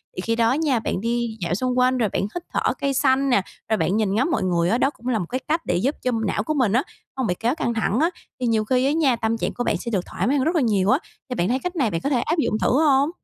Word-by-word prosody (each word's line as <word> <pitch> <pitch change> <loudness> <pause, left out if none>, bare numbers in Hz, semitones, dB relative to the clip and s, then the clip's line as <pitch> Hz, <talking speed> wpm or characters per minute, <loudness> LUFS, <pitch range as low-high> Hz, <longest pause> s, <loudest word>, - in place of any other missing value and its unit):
Thì - - -3
khi 230 +4 -1
đó 230 +1 +3
nha, 285 -4 +1
bạn 210 - -3
đi 235 0 -2
dạo 170 -1 -1
xung 250 +4 -1
quanh 255 +1 +3
rồi 225 -4 +1
bạn - - -1
hít 210 - -4
thở - - +1
cây 275 -1 +1
xanh 270 0 +2
nè, 220 -6 +4 0.3
rồi 220 - +2
bạn 200 +1 +1
nhìn 210 -3 +1
ngắm 225 - +2
mọi - - 0
người 175 -2 +1
á, 230 - +2
đó 270 - +2
cũng 250 -4 -12
là 240 -4 +1
một 180 - -3
cái 255 - -2
cách 320 +3 0
để - - 0
giúp 255 - 0
cho 255 - 0 0.2
não 205 - -1
của 310 - -1
mình 250 -9 +1
á 250 +4 +3 0.3
hông 260 -3 0
bị 180 - +1
kéo 240 +5 0
căng 235 -7 -1
thẳng 225 0 0
á, 325 +3 +3 0.3
thì 250 - -1
nhiều 220 -2 +1
khi 255 +3 +2
á 275 - +2
nha, 295 -5 +2
tâm 230 0 -1
trạng - - -2
của 245 - -3
bạn - - 0
sẽ 235 - -6
được 190 -4 -1
thoải - - -3
mái 280 +3 +2
hơn 265 - +1
rất 330 +3 +1
là 325 - +3
nhiều 205 -5 +2
á. 260 - +4 0.3
Thì 250 - -3
bạn 175 -4 0
thấy 255 +2 +1
cách 360 +5 -4
này 270 -9 +1
bạn 165 - -2
có 280 - -1
thể 255 -4 +1
áp 325 +7 -1
dụng 220 -8 0
thử - - +2 0.2
hông? 280 0 +4
245 Hz, 325 wpm, -23 LUFS, 220-275 Hz, 0.3 s, nè